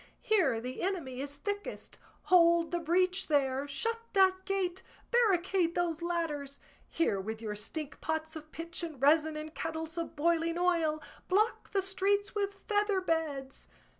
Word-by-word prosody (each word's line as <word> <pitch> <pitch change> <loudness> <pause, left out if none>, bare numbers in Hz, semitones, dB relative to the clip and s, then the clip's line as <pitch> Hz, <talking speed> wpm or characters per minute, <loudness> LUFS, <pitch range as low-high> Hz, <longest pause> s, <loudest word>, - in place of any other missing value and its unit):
Here 340 - +3
the 250 +3 -5
enemy 325 -9 -2
is 285 0 -5
thickest! 410 +7 -5 0.2
Hold 340 -2 +5
the 345 - 0
breach 365 +3 +1
there! 275 -2 +1
Shut 455 +12 -2
that 380 -1 +4
gate! 380 -2 -1 0.3
Barricade 375 -6 +3
those 340 -2 0
ladders! 310 -5 -2 0.3
Here 205 -12 +1
with 220 +3 -5
your 215 -2 -4
stink 295 +8 -6
pots 315 0 -2
of 310 0 -9
pitch 335 +1 -5
and 320 -5 -6
resin, 310 +3 +4
and 310 +1 -6
kettles 320 0 -4
of 330 0 -5
boiling 335 +2 +1
oil! 330 -4 +1 0.2
Block 425 +5 +1
the 390 -1 0
streets 395 +1 0
with 400 -1 -3
feather 415 -2 +2
beds!" 310 -6 -2
335 Hz, 150 wpm, -31 LUFS, 305-380 Hz, 0.3 s, Hold